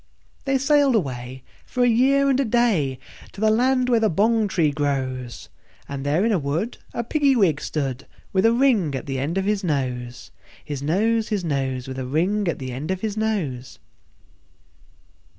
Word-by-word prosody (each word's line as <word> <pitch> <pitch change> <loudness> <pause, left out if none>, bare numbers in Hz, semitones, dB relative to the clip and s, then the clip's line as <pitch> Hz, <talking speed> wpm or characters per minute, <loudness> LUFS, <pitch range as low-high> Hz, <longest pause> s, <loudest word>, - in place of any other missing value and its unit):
They 270 -1 +2
sailed 275 -1 +3
away, 130 - -3 0.2
for 250 - -1
a - - +4
year 270 +4 +3
and 265 - +1
a - - +3
day, 215 - +1 0.4
To - - -11
the 215 0 +4
land 255 +3 +2
where 240 -2 +3
the 220 -1 +2
bong 215 +5 +2
tree 165 -6 +1
grows; 130 -4 -3 0.4
And 140 -1 -5
there 150 +8 +1
in 230 - +2
a 195 - +2
wood 160 - -3
a 235 - -3
Piggy 280 +2 +2
wig 170 - +2
stood, 135 -4 -3 0.3
With 190 +3 +4
a - - +4
ring 230 - +2
at 135 - -5
the 135 -2 -3
end 155 +7 -2
of 190 - 0
his 205 -1 0
nose, 125 -6 -3 0.3
His 145 -2 -5
nose, 215 +9 +1
His 205 -4 -1
nose, 135 -4 -2
With 130 0 -6
a 130 - -4
ring 185 +9 0
at 170 - -1
the 130 -1 -6
end 135 +6 -5
of 190 0 -2
his 215 -2 -2
nose. 185 - -2
185 Hz, 185 wpm, -23 LUFS, 135-230 Hz, 0.4 s, a